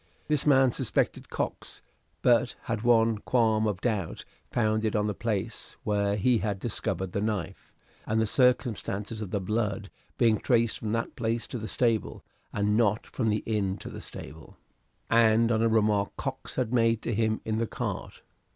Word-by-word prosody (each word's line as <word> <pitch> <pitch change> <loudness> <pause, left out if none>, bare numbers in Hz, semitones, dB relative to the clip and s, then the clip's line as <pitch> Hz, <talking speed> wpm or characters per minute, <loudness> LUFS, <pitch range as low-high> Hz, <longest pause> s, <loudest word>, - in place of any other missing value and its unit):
This 150 -1 +1
man 135 -3 +5
suspected - - -1
Cox, - - -4 0.4
but - - +3
had 115 -2 -2
one 115 -2 +3
qualm 110 -2 +2
of 100 -2 -2
doubt 105 -8 -2 0.2
founded 110 -1 +1
on 105 -1 +2
the 105 - -1
place 105 -2 -3
where 100 -1 +1
he 115 +3 +3
had 100 -2 -2
discovered 95 -4 -2
the 100 - -2
knife, 105 -6 -3 0.4
and 110 +1 +1
the 110 - +3
circumstance 115 -4 +1
of 105 - -4
the 100 - -1
blood 100 0 -2 0.3
being 115 -3 +3
traced 115 -2 +2
from 110 - -3
that 115 0 -2
place 115 0 -1
to 125 - -5
the 110 - -5
stable, 115 -3 0 0.3
and 105 0 +1
not 110 -1 +2
from 115 -4 -1
the 105 0 0
inn 100 -3 0
to - - -8
the - - -8
stable, 80 +1 -10 0.5
and 115 0 +4
on 110 -1 +2
a 115 - +3
remark 105 -2 +2
Cox - - -5
had 125 -2 -1
made 115 -2 +2
to 115 - -1
him 110 0 +1
in 110 0 -1
the 115 - 0
cart. - - -5
110 Hz, 175 wpm, -28 LUFS, 105-115 Hz, 0.5 s, man